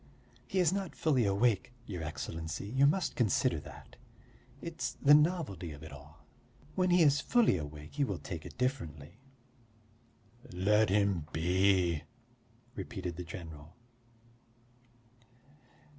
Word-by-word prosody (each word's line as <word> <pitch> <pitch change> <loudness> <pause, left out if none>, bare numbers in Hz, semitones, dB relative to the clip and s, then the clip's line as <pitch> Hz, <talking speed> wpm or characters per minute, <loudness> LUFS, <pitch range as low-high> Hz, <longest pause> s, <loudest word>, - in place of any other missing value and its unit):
"He 195 - -3
is 180 -2 +4
not 195 -2 -3
fully 135 -8 +2
awake, 115 +4 +1
your 90 -5 -5
Excellency, 80 +2 -5
you 130 +7 +3
must 175 +4 0
consider 110 -7 +2
that; - - -13 0.6
it's 140 -7 -4
the 145 +3 +5
novelty 150 - +2
of 75 +1 -11
it 80 - -9
all. 70 +2 -14 0.5
When 185 -1 +1
he 175 -1 +5
is 145 -1 +4
fully 240 - +3
awake 75 -2 -7
he 145 - 0
will - - -2
take 80 -4 -7
it - - -11
differently." 85 - -3 1.3
"Let 105 +3 +3
him 100 -5 +1
be," 90 -1 +2 0.7
repeated 95 -7 -5
the 90 - -5
general. 80 -3 -10
100 Hz, 125 wpm, -32 LUFS, -, 1.3 s, the